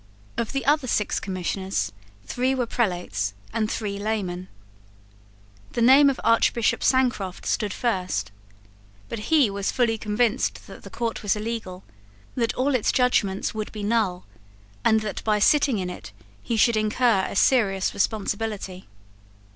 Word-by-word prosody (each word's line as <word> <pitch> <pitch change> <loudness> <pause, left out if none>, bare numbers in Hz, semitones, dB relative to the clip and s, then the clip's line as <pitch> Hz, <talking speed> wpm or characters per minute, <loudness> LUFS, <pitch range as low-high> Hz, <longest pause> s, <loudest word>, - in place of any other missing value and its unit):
Of 235 - -2
the 275 -1 -2
other 290 -1 +2
six 210 -3 0
Commissioners 185 - -2 0.3
three 255 +2 0
were 250 -2 0
prelates 175 - -1 0.2
and 220 -2 0
three 200 -3 -3
laymen. 195 -4 -3 1.3
The 235 - -1
name 275 +4 +7
of 270 - -2
Archbishop 230 0 +2
Sancroft 245 -8 +1
stood 210 -2 0
first. 180 - -2 0.8
But 210 -2 -5
he 285 -10 +5
was 200 0 -2
fully 230 -3 +1
convinced 225 +4 0
that - - -12
the - - -11
court 235 -1 -3
was 205 -1 +1
illegal, 210 -4 -5 0.5
that 230 -3 -1
all 275 +2 +1
its 250 -5 +2
judgments 220 -7 +1
would 215 -1 -4
be 210 -2 -6
null, 205 -4 0 0.6
and 220 0 +4
that 215 -2 -5
by 215 -1 +2
sitting 275 +3 +3
in 180 -2 -3
it 105 - -10 0.3
he 230 - -2
should 230 +1 +4
incur 215 -2 +2
a - - -7
serious 195 -5 +2
responsibility. 205 -2 -2
215 Hz, 145 wpm, -24 LUFS, 195-240 Hz, 1.3 s, name